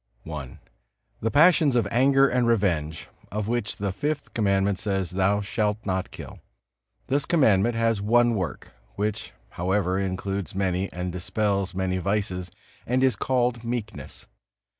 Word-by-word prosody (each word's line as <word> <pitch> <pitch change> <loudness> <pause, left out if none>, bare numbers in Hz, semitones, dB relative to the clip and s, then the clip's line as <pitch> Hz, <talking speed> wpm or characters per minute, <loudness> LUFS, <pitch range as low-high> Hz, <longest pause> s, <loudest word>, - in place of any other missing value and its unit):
I. 75 -5 -7 0.6
The 115 - 0
passions 155 -1 +5
of 115 -4 +2
anger 135 +3 +4
and 125 -2 +1
revenge, 85 -9 0 0.2
of 105 0 -2
which 120 -1 -1
the 100 -1 -2
Fifth 145 +8 -3
Commandment 100 -2 +1
says, 95 -4 -2
"Thou 95 +2 +1
shalt 105 +1 -1
not 95 -1 -1
kill." - - -10 0.7
This 140 +2 0
Commandment 120 - +3
has 115 -2 +1
one 120 +3 +3
work, 95 -7 -4 0.2
which 105 0 -2 0.3
however 95 0 +1
includes 95 +1 -3
many 95 0 -1
and 90 0 -4
dispels 100 +1 -1
many 95 0 -1
vices, 95 -2 -2 0.4
and 130 +2 +1
is 130 -4 +3
called 120 0 0
meekness. 115 -3 -5
100 Hz, 140 wpm, -25 LUFS, 95-120 Hz, 0.7 s, passions